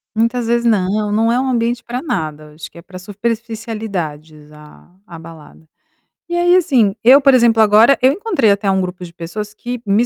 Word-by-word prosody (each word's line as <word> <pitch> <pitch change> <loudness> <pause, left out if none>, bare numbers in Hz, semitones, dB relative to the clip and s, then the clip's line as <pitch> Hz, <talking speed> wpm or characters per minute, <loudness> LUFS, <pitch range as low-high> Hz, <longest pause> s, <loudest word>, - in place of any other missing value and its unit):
Muitas 230 +1 -1
vezes, 235 0 0
não, 210 -1 0
não 225 +2 +1
é 245 - +1
um 265 - -2
ambiente 240 -1 -1
pra 245 +2 -5
nada, 155 - -5
acho 150 -1 -10
que - - -19
é - - -11
para 185 +1 -12
superficialidades 205 -8 -6
a 150 +3 -18
a 170 - -11
balada. 160 -1 -14 0.6
E 345 - -2
aí 350 +1 +3
assim, 255 - +2
eu, 260 +4 +7
por 275 -1 +4
exemplo, 235 -3 +4
agora, 220 +5 +5
eu 260 +2 +4
encontrei 340 - 0
até 200 -1 0
um 190 - 0
grupo 180 -1 -5
de 170 -1 -11
pessoas 205 +5 -7
que 245 +2 -7
me 210 +4 +2
215 Hz, 195 wpm, -16 LUFS, 180-240 Hz, 0.6 s, eu